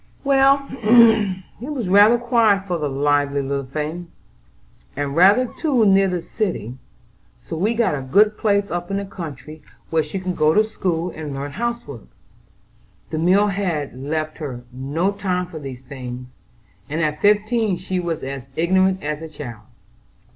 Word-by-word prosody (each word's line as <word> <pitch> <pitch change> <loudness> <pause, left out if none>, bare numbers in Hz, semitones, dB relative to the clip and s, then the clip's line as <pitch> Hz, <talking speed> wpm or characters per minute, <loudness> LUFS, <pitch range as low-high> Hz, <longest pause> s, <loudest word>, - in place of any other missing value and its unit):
"Well, 275 0 +4
it 225 0 +3
was 250 -9 -3
rather 205 +5 +6
quiet 230 -5 +2
for 175 -3 -2
the 150 -1 -1
lively 145 0 +1
little 140 0 -3
thing, 155 +5 -4 0.9
and 140 0 -2
rather 200 +9 +6
too 255 -3 0
near 195 -1 +5
the 180 -2 -2
city, 150 - -3 0.6
so - - -8
we 205 +8 0
got 230 -6 +2
a 140 - -3
good 205 +11 +3
place 200 -2 0
up 175 0 -3
in 195 - -1
the 200 - -3
country 155 -4 -9 0.3
where 160 -1 +3
she 155 +6 -5
could 185 -1 -3
go 155 0 +3
to 215 - +5
school 180 -5 -2
and 150 -3 -6
learn 140 +1 -5
housework. 230 - -5 1.0
The 155 - -2
mill 190 +5 +3
had 180 -8 -2
left 155 +4 -4
her 130 -6 -6
no 145 +9 -1
time 185 -3 -2
for 170 -3 -9
these 135 -3 -8
things, 125 -2 -7 0.6
and 155 +3 -2
at 150 -2 -1
fifteen 210 -1 +2
she 185 +1 -3
was 170 -3 -3
as 135 -1 -6
ignorant 185 +3 +2
as 150 +1 -3
a 160 - -7
child." 120 -8 -9
175 Hz, 160 wpm, -21 LUFS, 145-205 Hz, 1.0 s, rather